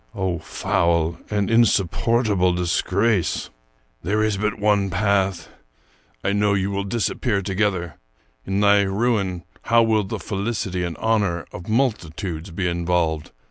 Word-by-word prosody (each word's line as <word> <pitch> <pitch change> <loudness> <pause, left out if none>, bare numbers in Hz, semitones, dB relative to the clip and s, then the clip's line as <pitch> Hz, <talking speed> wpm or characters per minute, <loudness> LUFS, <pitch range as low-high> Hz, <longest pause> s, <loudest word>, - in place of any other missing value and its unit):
Oh, 95 -3 -1
foul 85 0 0
and 105 0 0
insupportable 105 -2 +2
disgrace! 90 +3 0 0.2
" - - -41
There 105 +5 +1
is 110 -2 +1
but 105 +2 -1
one 105 -2 +2
path. 95 -2 0 0.8
I 100 - +1
know 105 0 +2
you 95 0 -1
will 100 0 -2
disappear 105 -1 -1
to 95 - -3
gether. 90 -5 -1 0.4
In 95 +1 -1
thy 100 0 +5
ruin, 100 -3 0 0.2
how 115 0 +5
will 110 -2 +2
the 95 - -4
felicity 100 -3 -3
and 85 -2 -4
honor 105 -7 0
of 85 - -9
multitudes 95 - -1
be 90 +2 -2
involved! 85 -2 0
100 Hz, 140 wpm, -22 LUFS, 90-105 Hz, 0.8 s, thy